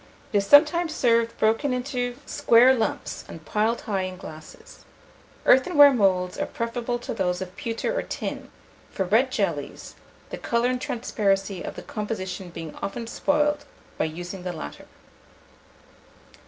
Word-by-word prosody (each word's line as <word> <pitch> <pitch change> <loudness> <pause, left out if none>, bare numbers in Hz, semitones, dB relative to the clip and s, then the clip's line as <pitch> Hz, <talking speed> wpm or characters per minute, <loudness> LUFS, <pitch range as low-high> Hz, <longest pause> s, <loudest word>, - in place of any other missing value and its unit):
It - - +4
is 200 - -3
sometimes 315 +3 +5
served 230 -3 +2
broken 225 +5 +2
into 250 -1 -2
square 240 +3 +5
lumps, 225 -4 -2
and 160 -1 -11
piled 220 +2 0
high 200 -3 -2
in 185 0 -5
glasses. 155 -3 -12 0.6
Earthenware 285 +1 +7
moulds 185 -5 +1
are - - -1
preferable 235 +1 -3
to 240 - -6
those 180 -2 -1
of 185 0 -7
pewter 230 - -3
or - - 0
tin, - - -5 0.4
for 190 - -2
red 230 +8 +3
jellies, - - -3 0.4
the - - -5
colour 235 +1 +1
and 250 0 -2
transparency 195 -5 -1
of - - -6
the - - -8
composition 190 -4 -5
being 165 -2 -8
often 230 +4 -4
spoiled 295 +5 0 0.3
by - - +2
using 175 +4 -6
the 180 0 -4
latter. 70 - -8
225 Hz, 145 wpm, -25 LUFS, 185-250 Hz, 0.6 s, Earthenware